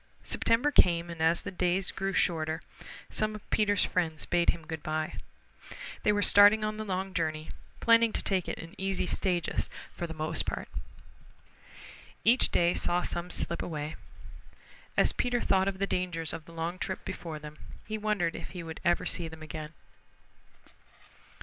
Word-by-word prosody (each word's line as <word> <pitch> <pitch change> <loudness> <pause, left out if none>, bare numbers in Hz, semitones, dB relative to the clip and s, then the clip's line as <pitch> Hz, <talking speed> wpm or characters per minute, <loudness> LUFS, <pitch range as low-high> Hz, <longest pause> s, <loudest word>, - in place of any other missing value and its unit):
September 235 +6 +2
came, 170 -8 +4
and 165 -1 -7
as 165 +1 +3
the - - -4
days 180 +1 +1
grew 195 0 -2
shorter, 160 -3 +1 0.5
some 215 0 0
of 210 - -11
Peter's 205 -2 +3
friends 160 -4 -1
bade 175 -1 +2
him 165 -2 -1
good 160 -1 -5
by. 155 0 -2 0.9
They 210 - +3
were 205 0 +2
starting 205 +1 +7
on 215 0 -1
the 215 - -3
long 190 -1 -3
journey, 155 -2 -2 0.3
planning 230 0 +5
to - - +2
take 190 -3 +1
it - - -3
in 165 +2 -9
easy 195 -1 0
stages 180 -3 0 0.2
for 175 - -4
the 160 - -7
most 155 0 0
part. - - -3 1.5
Each 240 +3 +5
day 175 0 +3
saw 175 0 0
some 175 +1 -2
slip 170 - 0
away. 150 -2 -4 1.0
As - - +5
Peter 245 -1 +1
thought 190 -3 +2
of 195 -1 -1
the 195 - +1
dangers 175 -5 -2
of 160 -1 -6
the - - -13
long 165 +2 -3
trip 190 - -4
before 170 -4 -5
them 150 0 -10 0.3
he 215 0 -4
wondered 205 -6 0
if 165 - -7
he 170 - -4
would 160 -1 -7
ever 175 0 +2
see 170 - -1
them 160 -1 -10
again. 155 0 -6
175 Hz, 170 wpm, -30 LUFS, 160-195 Hz, 1.5 s, starting